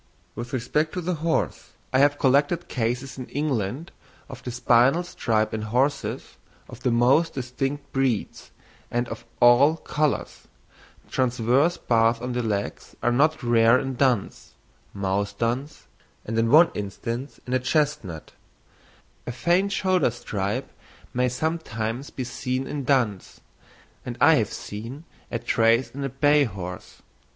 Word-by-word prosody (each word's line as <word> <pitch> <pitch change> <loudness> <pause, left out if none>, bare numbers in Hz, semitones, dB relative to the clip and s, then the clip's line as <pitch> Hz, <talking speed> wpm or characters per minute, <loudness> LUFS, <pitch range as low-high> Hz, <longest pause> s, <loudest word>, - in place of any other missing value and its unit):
With 120 +2 -7
respect 150 +5 -1
to 180 - -3
the 180 +2 -1
horse, 165 0 -1 0.2
I 130 - +4
have 145 +1 +4
collected 145 +6 +2
cases 125 +3 -3
in 125 - -6
England 140 - -2 0.4
of 130 -3 -9
the - - -6
spinal 125 +6 +3
stripe 110 -10 -1
in 110 - -2
horses 125 +7 -1 0.3
of - - -11
the - - 0
most 125 +8 +3
distinct 135 +3 -4
breeds, 130 -5 -1 0.4
and 120 0 -1
of - - -7
all 130 +6 +6
colours; 150 -2 -2 0.6
transverse 130 +6 +2
bars 115 0 +2
on 125 +1 -4
the 125 - -1
legs 105 -3 -3
are 120 - +3
not 155 +4 +2
rare 115 0 +5
in 135 0 -3
duns, 125 -5 -1 0.4
mouse 100 0 -1
duns, 120 +7 -3 0.4
and 110 - -4
in 115 0 +2
one 160 +6 +7
instance 115 +6 -5
in 125 - -4
a 130 - +3
chestnut; 130 - -1 1.0
a - - -2
faint 175 +11 +1
shoulder 185 -7 +2
stripe 105 -4 -3 0.4
may 125 0 +1
sometimes 125 -4 -3
be 130 - -5
seen 130 +1 -3
in 140 -1 -4
duns, 120 -8 0 0.6
and - - -6
I - - +7
have - - 0
seen 115 +9 -7 0.3
a 115 - 0
trace 115 +1 +2
in 140 +1 -6
a 135 - -1
bay 145 +2 +3
horse. 90 -5 -8
125 Hz, 145 wpm, -25 LUFS, 115-145 Hz, 1.0 s, one